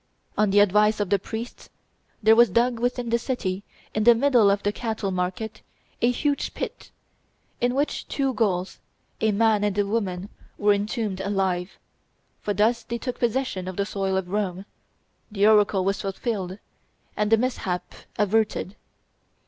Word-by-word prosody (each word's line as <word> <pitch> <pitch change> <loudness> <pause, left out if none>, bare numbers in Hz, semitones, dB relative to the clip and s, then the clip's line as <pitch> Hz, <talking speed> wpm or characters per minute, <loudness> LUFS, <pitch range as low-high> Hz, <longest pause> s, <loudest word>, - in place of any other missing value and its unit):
On 210 -1 +2
the 205 +1 +5
advice 210 +2 +3
of 205 -3 -2
the 200 - +4
priests, 225 +5 -7 0.5
there 220 +1 +7
was 235 -1 +6
dug 235 +4 +2
within 245 -1 -1
the 235 - +3
city, 200 -7 -3 0.3
in 215 - 0
the 235 +1 +7
middle 240 -4 +4
of 200 0 +1
the 205 - +1
cattle 220 -3 -3
market, 190 +4 -3 0.4
a 240 - +4
huge 285 +3 -1
pit, - - -6 0.7
in 245 +1 +1
which 285 +2 -1
two 270 -2 -1
Gauls, 190 -5 -1 0.4
a 220 - +2
man 215 0 +3
and 205 -1 0
a 205 - +2
woman, 200 -3 -2 0.3
were 205 0 +4
entombed 205 -1 -2
alive; 190 -2 -1 0.6
for 210 - -2
thus 220 +4 +2
they 235 +1 -4
took 250 +1 -5
possession 240 -6 -1
of 185 - -5
the 200 - +1
soil 195 -2 -1
of 185 -2 -3
Rome, 195 -2 -2 0.7
the 205 -1 +2
oracle 210 -3 +4
was 195 0 0
fulfilled, 195 -2 -3 0.6
and 210 0 0
the 225 - +7
mishap 195 -7 -2 0.2
averted. 210 -2 0
210 Hz, 160 wpm, -25 LUFS, 195-230 Hz, 0.7 s, there